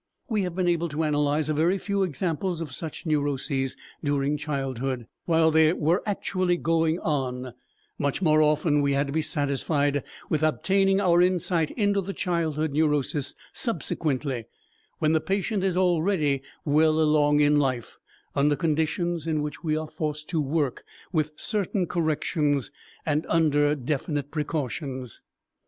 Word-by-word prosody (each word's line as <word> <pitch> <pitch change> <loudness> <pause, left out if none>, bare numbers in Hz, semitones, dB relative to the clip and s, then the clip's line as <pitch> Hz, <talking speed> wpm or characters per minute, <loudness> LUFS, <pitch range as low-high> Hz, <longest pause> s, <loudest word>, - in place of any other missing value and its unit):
We 220 -5 0
have 180 -3 -3
been 185 -1 0
able 170 -1 +1
to 155 +2 -2
analyze 150 0 +1
a 155 - +1
very 165 +6 +2
few 200 +1 -1
examples 175 +1 -1
of 160 -5 -5
such 160 +6 -6
neuroses 140 -3 -1 0.3
during 145 0 +1
childhood, 135 -4 -3 0.2
while 160 -1 +4
they 160 0 +5
were 165 +3 +1
actually 185 -3 0
going 165 -1 +1
on; 130 -4 -2 0.5
much 140 -1 0
more 155 -4 +4
often 150 0 +3
we 140 0 +2
had 140 +1 +2
to 140 - -5
be 160 - +1
satisfied 145 -1 0 0.3
with 155 - 0
obtaining 195 +5 +2
our 175 -3 +4
insight 175 -3 +2
into 205 -3 +1
the 195 +1 -5
childhood 160 -4 -1
neurosis 145 -2 0 0.2
subsequently, 145 - -1 0.5
when 155 - +2
the 160 -1 +2
patient 195 +2 -1
is 185 -2 +1
already 170 -6 +2 0.2
well 155 +1 +3
along 150 -1 +4
in 145 0 +4
life, 130 -5 -2 0.4
under 145 +1 +3
conditions 165 +1 -1
in 155 -2 0
which 150 +2 -6
we 155 -2 +1
are 155 0 -3
forced 150 -1 -4
to 160 - 0
work 145 -2 -1 0.3
with 155 -2 +1
certain 200 0 -1
corrections 155 -4 0 0.3
and 150 0 0
under 150 -2 +3
definite 145 +1 -2
precautions. 140 -4 -4
155 Hz, 145 wpm, -26 LUFS, 145-170 Hz, 0.5 s, they